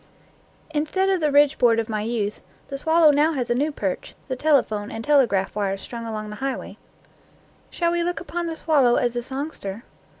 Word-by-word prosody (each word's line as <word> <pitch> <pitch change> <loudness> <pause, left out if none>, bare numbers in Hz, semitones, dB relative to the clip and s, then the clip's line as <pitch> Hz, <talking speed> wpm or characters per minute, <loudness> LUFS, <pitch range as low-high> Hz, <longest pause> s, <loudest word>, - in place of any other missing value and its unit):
Instead 315 +6 0
of 380 -1 +2
the 305 -2 +1
ridge 290 +1 +4
board 230 -2 +4
of 225 - -2
my 215 -2 -2
youth, 215 -2 -2 0.3
the 275 - -4
swal 320 +4 +2
low 310 -2 +8
now 300 +3 +3
has 250 -4 -2
a - - +5
new 290 +5 0
perch, 195 -10 -4
the 260 - -1
telephone 250 -8 +1
and 225 - -6
tele 285 -4 +5
graph 195 -2 -1
wires 195 -2 -1
strung 230 +3 -7
along 215 -1 -5
the 210 - -7
highway. 270 -1 -4 0.9
Shall 340 -1 0
we 345 0 0
look 350 0 -1
upon 345 +1 -4
the 325 - -3
swallow 280 -7 +3
as 245 -1 0
a 240 - -1
songster? 255 -5 -6
265 Hz, 205 wpm, -23 LUFS, 225-310 Hz, 0.9 s, low